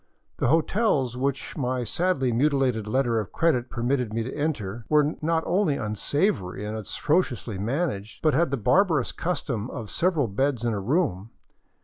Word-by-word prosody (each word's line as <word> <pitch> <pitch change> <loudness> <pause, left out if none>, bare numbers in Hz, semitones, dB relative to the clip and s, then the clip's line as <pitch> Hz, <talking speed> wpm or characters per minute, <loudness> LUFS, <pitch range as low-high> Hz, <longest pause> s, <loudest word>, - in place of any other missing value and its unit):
The - - +1
hotels 160 - +2
which 135 +1 -2
my 130 -2 -1
sadly 135 - 0
mutilated 130 -4 +1
letter 120 0 +1
of 105 - -5
credit 135 -7 +1
permitted 120 -1 -1
me 115 - 0
to 130 - -5
enter 120 -8 -2
were 150 0 +3
not 160 +1 +1
only 175 -5 +2
unsavory 105 - -1
and 105 +1 -4
atrociously 120 - -1
managed, 115 - -2
but 155 -2 +4
had 165 +4 +3
the 140 - -1
barbarous 160 - +2
custom 125 -10 -3
of 110 -3 -7
several 165 -5 +1
beds 125 +3 0
in 115 - +1
a 105 - -2
room. 115 - 0
130 Hz, 155 wpm, -26 LUFS, 115-155 Hz, -, but